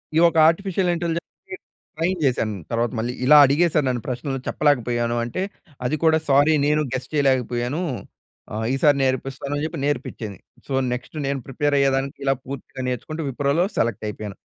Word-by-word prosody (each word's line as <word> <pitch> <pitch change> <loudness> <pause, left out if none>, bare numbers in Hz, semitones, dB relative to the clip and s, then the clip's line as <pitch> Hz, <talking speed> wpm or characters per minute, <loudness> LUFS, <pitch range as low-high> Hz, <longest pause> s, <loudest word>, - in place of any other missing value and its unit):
ఈ - - +5
ఒక 165 - -4
artificial 185 +2 +1
ఇంటెలిజెన్స్‌కి 170 +2 -5 0.4
train 170 +3 -1
చేశాను 115 -5 0 0.2
తర్వాత 115 0 0
మళ్ళీ, 120 +2 -2
ఇలా 150 +3 +8
అడిగేసారు 150 +2 +2
నన్ను 120 -3 -2
ప్రశ్నలు 135 +1 -3
చెప్పలేకపోయాను 120 -5 +1
అంటే 120 +10 -3 0.5
అది 145 - 0
కూడా 160 -1 +5
సారీ 145 +3 +5
నేను 150 +1 +2
గెస్ 130 0 -4
చేయలేకపోయాను, 130 0 +1 0.7
ఆహ్, 110 +1 -2
ఈసారి 140 +1 +4
నేర్పిస్తాను 135 +2 -2
అని 145 - -2
చెప్పి 160 -1 -5
నేర్పించింది. 120 -7 -3 0.3
సో, 140 - -4 0.2
నెక్స్ట్ 125 +5 -7
నేను 140 0 -1
ప్రిపేర్ 145 +2 0
అయ్యేదానికి 135 0 +1
ఇలా 135 0 +3
పూర్తిగా 135 0 -7
నేర్చుకుంటూ 155 +6 -4
విప్రోలో 140 +6 +1
సెలెక్ట్ 115 -1 0
అయిపోయాను. 105 -1 -7
135 Hz, 155 wpm, -23 LUFS, 125-155 Hz, 0.7 s, ఇలా